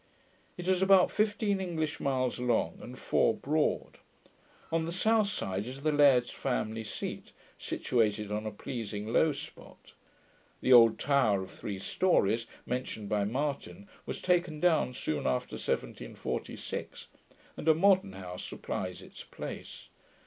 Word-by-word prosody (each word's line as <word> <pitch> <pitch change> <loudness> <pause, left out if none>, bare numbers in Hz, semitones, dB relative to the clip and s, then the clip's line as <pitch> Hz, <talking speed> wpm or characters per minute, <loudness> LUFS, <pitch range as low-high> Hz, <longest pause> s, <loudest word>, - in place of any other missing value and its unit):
It 175 0 -6
is 185 -1 +2
about 190 -1 +6
fifteen 210 -2 +1
English 160 -5 -2
miles 130 -2 0
long, 120 -9 0
and 125 +1 -9
four 115 - +2
broad. 150 +2 -1 0.7
On 165 0 +1
the 165 - -3
south 215 +3 +2
side 100 - -3
is 135 +2 -8
the 155 - +2
laird's 140 -5 +5
family 115 -4 -2
seat, 105 - -6 0.3
situated 105 -3 0
on 105 +1 -2
a - - -3
pleasing 110 -1 -5
low 160 - +4
spot. 140 - -11 0.7
The 130 - +4
old 115 -2 +8
tower 120 -9 +2
of 95 - -10
three 100 -2 -5
stories, 115 - +1 0.2
mentioned 125 -4 -4
by 105 -1 +1
Martin, 145 - -3 0.2
was - - -5
taken 175 -4 +1
down 160 -6 +3
soon 75 - -2
after 65 -1 -1
1746, - - -4 0.5
and - - -7
a 160 - +7
modern 190 - +4
house 90 -1 -7
supplies - - -5
its - - -11
place. - - -8
130 Hz, 140 wpm, -30 LUFS, 110-170 Hz, 0.7 s, old